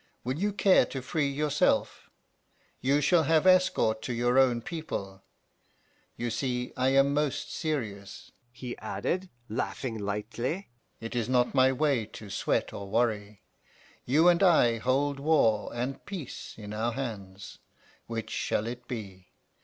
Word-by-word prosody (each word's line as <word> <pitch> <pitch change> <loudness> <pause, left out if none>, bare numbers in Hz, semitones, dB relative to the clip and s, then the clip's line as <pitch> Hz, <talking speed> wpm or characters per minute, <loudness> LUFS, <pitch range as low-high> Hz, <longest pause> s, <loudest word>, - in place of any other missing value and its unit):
Will 130 +5 -2
you 205 +2 +1
care 195 -1 +4
to 135 - -5
free 150 +2 0
yourself? 145 +1 0 0.7
You 140 +3 +2
shall 170 +4 +4
have 160 +2 +3
escort 185 -12 +4
to 125 - -3
your 120 +2 +2
own 120 -3 +3
people. 100 - -5 1.0
You 120 0 -2
see 125 +1 -2
I 130 +1 +2
am 135 +1 +4
most 150 -1 -1
serious,' 110 - -4 0.2
he 125 0 -7
added, 185 +1 -3 0.2
laughing 115 +1 -3
lightly. 115 - -3 0.3
'It 115 +2 -6
is 120 -1 -1
not 125 -1 +2
my 130 -1 +5
way 135 -5 +1
to 105 -2 -10
sweat - - -1
or 100 -1 -7
worry. 105 -2 -1 0.6
You 155 +7 +4
and 175 0 +5
I 140 -11 +5
hold 140 +4 0
war 140 -8 +2
and 125 +3 -4
peace 185 -10 -7
in 105 -1 -8
our 115 +2 -1
hands. 100 -7 -6 0.5
Which 115 -1 -5
shall 105 - -1
it 125 +1 -6
be? 95 -6 -7
125 Hz, 145 wpm, -29 LUFS, 110-145 Hz, 1.0 s, my